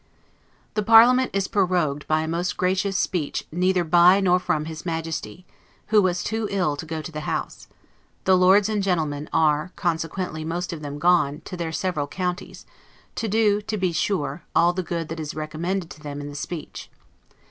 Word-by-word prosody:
The 215 - 0
parliament 235 +4 +6
is 195 -1 -1
prorogued 175 -7 0
by 155 0 +2
a 160 - -3
most 170 +3 -2
gracious 190 +1 0
speech 165 -6 -2
neither 180 +2 +1
by 175 +3 +6
nor 180 -2 +3
from 155 -4 -1
his 160 -1 -7
Majesty, 165 +1 -4 0.4
who 215 -1 +5
was 180 -2 0
TOO 220 0 -2
ILL 180 -7 0
to 160 - -7
go 160 0 -4
to 160 - -7
the 155 - -5
House; - - -4 0.6
the 190 - +4
Lords 190 +2 +5
and 215 -2 -1
Gentlemen 155 -6 -1
are, 155 +2 +2
consequently, 165 -1 -2
most 175 +3 -3
of 160 - -7
them, 145 -1 -6
gone 160 -2 +2
to 185 - -6
their 170 -2 -3
several 160 -4 -2
counties, 180 +3 -4 0.5
to 225 - -3
do 210 -1 +2
(to 215 +1 -4
be 185 -2 0
sure) 155 -2 -1
all 175 +1 +4
the 185 - -2
good 170 -2 -4
that 165 0 -5
is 150 -2 -5
recommended 165 +4 -3
to 155 - -12
them 145 -1 -6
in 145 0 -6
the 145 - -9
speech. 155 +2 -7
175 Hz, 185 wpm, -24 LUFS, 155-190 Hz, 0.6 s, parliament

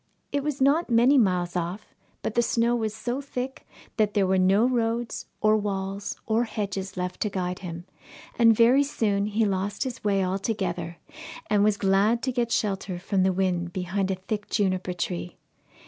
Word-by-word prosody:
It 285 -1 -1
was 295 -2 -2
not 280 +5 +3
many 240 +4 +5
miles 180 -5 +1
off, 180 +4 -4 0.3
but - - -2
the 235 - +3
snow 235 0 +2
was 220 -2 -2
so 245 +4 -3
thick 265 -1 -6 0.3
that 215 -1 +1
there 200 -2 +3
were 190 0 +2
no 195 +5 +4
roads, 235 -1 -1
or 215 0 +4
walls, 200 -1 -3
or 230 +2 +1
hedges 200 -4 -4
left 180 0 -3
to 210 - +1
guide 180 -2 -3
him, 170 -2 -7 0.5
and 230 -1 +5
very 245 +4 +6
soon 210 -8 0
he 215 +1 +1
lost 195 +2 -1
his 255 -3 -6
way 195 -2 +2
altogether, 185 -3 -2 0.5
and 205 -1 +4
was 210 -1 +3
glad 205 +5 +2
to 260 - 0
get 240 -2 -1
shelter 195 -4 -1
from 190 +2 0
the 190 0 +3
wind 180 -2 -1
behind 190 +1 -1
a 190 - 0
thick 205 +3 -5
juniper 185 -2 0
tree. 175 0 -4
205 Hz, 180 wpm, -26 LUFS, 185-230 Hz, 0.5 s, very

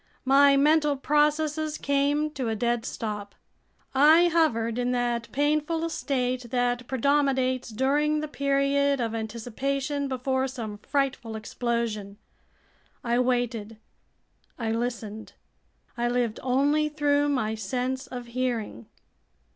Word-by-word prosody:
My 275 +1 +6
mental 300 0 +3
processes 300 +2 +1
came 285 +2 +1
to 260 -6 -3
a 220 - -1
dead 235 +1 0
stop. 210 -2 -5 0.6
I 315 +6 +6
hovered 235 -9 +1
in 245 0 0
that 240 -1 -1
painful 305 +3 0
state 255 -4 -2
that 245 0 0
predominates 265 -1 +1
during 290 +6 +1
the 305 - -3
period 280 -1 +1
of 230 -2 -1
anticipation 265 +6 -3
before 260 0 -1
some 225 -6 -6
frightful 275 -4 -2
explosion. 220 -2 -3 0.9
I 240 0 +1
waited, 240 -3 -1 0.8
I 225 -3 -2
listened, 225 -2 -4 0.6
I 240 0 0
lived 240 -2 0
only 285 +4 +2
through 290 -1 +1
my 255 -6 0
sense 250 +5 -3
of 245 -1 -7
hearing! 235 - -3
255 Hz, 115 wpm, -26 LUFS, 235-285 Hz, 0.9 s, My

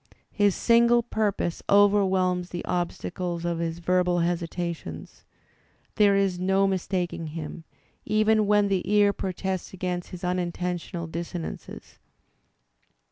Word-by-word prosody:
His 205 -2 +2
single 235 0 +4
pur 220 -3 0
pose 175 -3 -3
overwhelms 190 -3 +3
the 175 - -5
obstacles 175 0 -3
of 170 -1 -1
his 165 -1 -2
verbal 180 0 +1
hesitations. 170 - -4 0.7
There 205 -2 +4
is 195 -2 +1
no 190 +2 +2
mistaking 180 -3 -2
him, 160 +1 -7 0.4
even 215 0 +2
when 205 0 +4
the 195 -2 +1
ear 205 -1 +4
protests 190 0 -4
against 180 -1 -3
his 180 -1 -9
unintentional 180 -1 -2
dissonances. 170 +1 -7
180 Hz, 115 wpm, -26 LUFS, 175-200 Hz, 0.7 s, single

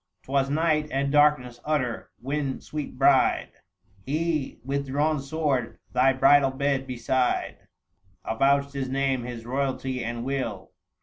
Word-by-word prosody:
'Twas 135 0 0
night, 155 0 +1
and 140 0 -1
darkness 145 -5 +3
utter, 135 -6 -1
when, 135 +1 -2
sweet 150 -4 -6
bride, 135 0 +3 0.5
He 155 +1 -2
with 140 +1 -2
drawn 150 +3 +1
sword 135 -4 -1 0.2
thy 130 +1 +4
bridal 135 +1 +5
bed 135 0 -1
beside 125 0 -1 0.7
Avouched 140 +4 +2
his 135 -2 -3
name, 135 -2 0
his 120 -2 -7
royalty, 130 0 -2
and 120 +1 -4
will. 125 -8 -3
135 Hz, 125 wpm, -26 LUFS, 130-145 Hz, 0.7 s, bridal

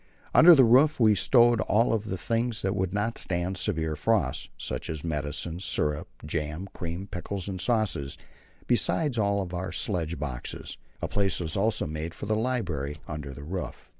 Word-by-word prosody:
Under 170 +1 +9
the 135 - +7
roof 130 +6 +5
were 110 -3 +5
stowed 120 +2 +5
all 115 +2 +2
the 100 -2 -5
things 115 +3 -1
that 95 +1 0
would 95 -2 -1
not 105 +3 -1
stand 90 0 0
severe 80 -5 -1
frost, 75 - 0
such - - -4
as 80 -2 -4
medicines, 80 +2 -3
syrup, 75 -4 0 0.2
jam, 75 +3 -3
cream, 85 +3 -5
pickles, 95 0 -5
and 95 -2 -4
sauces, 95 - 0 0.5
besides 125 +1 +1
all 100 -2 +1
our 90 +1 -3
sledge 85 -3 -1
boxes. 65 -4 -5 0.2
A - - +1
place 100 -2 0
was 80 -3 -3
also 110 +3 +1
made 80 +2 -5
for - - -6
the 110 +1 +1
library 95 - -2
under 75 -2 -6
the 70 +1 -9
roof. 90 +4 -6
95 Hz, 165 wpm, -27 LUFS, 80-110 Hz, 0.5 s, Under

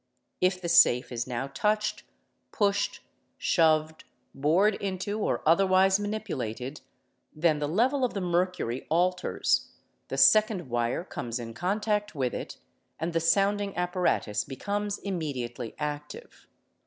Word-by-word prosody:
If 185 0 +2
the 175 - -5
safe 125 -7 +5
is 120 0 -3
now 125 +1 -3
touched, 210 +9 -1 0.5
pushed, 205 -3 0 0.4
shoved. 155 -1 +2 0.3
bored 170 +10 +3
into, 195 +2 -3
or - - -1
otherwise 190 +3 +4
manipulated, 150 - -4 0.5
then 155 -1 +2
the 145 - -1
level 250 - +1
of 250 - 0
the - - -1
mercury 175 -8 -1
alters. 180 +3 +1 0.4
the - - -4
second 215 - +4
wire 120 +6 0
comes 120 -9 -5
in 115 -2 -7
contact 210 - -1
with 130 -3 -1
it, - - -6 0.4
and 165 +2 -2
the 165 - +2
sounding 200 +4 +1
apparatu 180 - 0
becomes 205 +9 -3
immediately 135 - -4
active. 150 0 -6
175 Hz, 125 wpm, -28 LUFS, 140-200 Hz, 0.5 s, safe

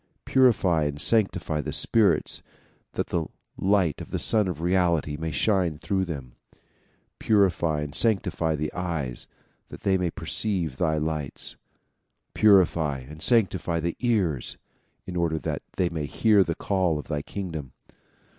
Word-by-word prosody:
Purify 100 - +3
and 75 0 -3
sanctify 95 -6 +2
the - - -5
spirits 110 -3 +2 0.5
that - - -2
the 85 -2 -1 0.3
light 95 -5 +1
of - - -9
the - - -2
Sun 110 -3 +2
of 90 -4 -4
Reality 85 -4 +1
may 80 +2 -4
shine 85 +1 +1
through 95 +3 -1
them. 70 -8 -7 0.9
Purify 90 -7 +2
and 75 -1 -5
sanctify 90 -7 +1
the 75 +1 -3
eyes 80 -9 -4 0.4
that - - -10
they 95 -1 +2
may 90 -1 0
perceive 85 -6 -2
thy 80 -3 +1
lights. 75 -2 -3 0.8
Purify 85 -8 +4
and 75 +4 -12
sanctify 95 -7 +2
the 85 +1 -2
ears 100 - 0 0.5
in 90 - -7
order 85 -2 0
that - - -3 0.2
they 90 - +2
may 80 -4 -4
hear 105 +4 +4
the 85 -3 -3
call 95 -5 0
of 75 - -7
thy 75 -2 -2
kingdom. 80 -7 -6
85 Hz, 145 wpm, -26 LUFS, 75-95 Hz, 0.9 s, Purify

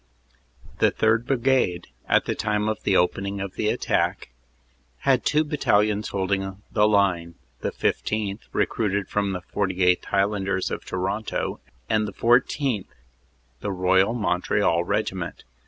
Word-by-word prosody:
The - - +4
3rd. 115 +2 +1
Brigade, 125 -9 +1 0.2
at - - +4
the - - -1
time 105 0 -1
of 110 0 -2
the 95 - +2
opening 100 +3 0
of 95 -1 -5
the 105 - -1
attack, - - 0 0.7
had 130 -2 +3
two 150 +1 +3
battalions 105 -8 +1
holding 95 0 -2
the 105 -1 +4
line, 90 -5 +1 0.2
the - - -2
15th., 105 -1 -1
recruited 100 -3 0
from 100 -1 0
the 90 - -4
48th. 90 -1 +1
Highlanders 100 -1 0
of - - -4
Toronto, 95 +4 -3 0.3
and 105 +6 +1
14th., 120 0 +1 0.7
the 105 - -3
Royal 95 +4 +2
Mont 90 -6 -1
real 95 -5 +2
Regiment. - - -3
100 Hz, 130 wpm, -24 LUFS, 95-110 Hz, 0.7 s, The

